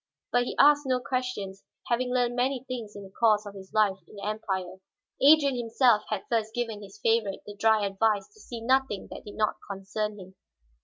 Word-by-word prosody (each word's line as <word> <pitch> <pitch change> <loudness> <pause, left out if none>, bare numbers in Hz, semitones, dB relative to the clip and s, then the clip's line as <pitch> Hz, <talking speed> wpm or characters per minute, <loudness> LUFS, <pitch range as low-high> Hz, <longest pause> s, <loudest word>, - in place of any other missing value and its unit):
But 245 0 +3
he - - -4
asked 290 0 +5
no 255 -1 +2
questions, 250 -7 -4 0.2
having 250 +1 0
learned 245 -1 +1
many 255 +1 0
things 235 -5 -6
in 200 - -8
the 190 - -12
course 215 0 +3
of 205 - -8
his 190 -1 -11
life 210 -3 +3
in - - -15
the 200 - -7
Empire. 190 -4 -3 0.4
Adrian 285 -1 +6
himself 235 -2 +3
had 215 -3 -2
first 220 -2 -1
given 230 -3 -3
his 200 +1 -12
favorite 225 -3 +1
the 205 - -9
dry 220 0 +3
advice 200 +1 +1
to 430 - -20
see 235 - -8
nothing 260 -3 +1
that - - -9
did 205 - -9
not 215 -1 0
concern 205 +2 -3
him. 190 -1 -12
220 Hz, 200 wpm, -27 LUFS, 205-250 Hz, 0.4 s, Adrian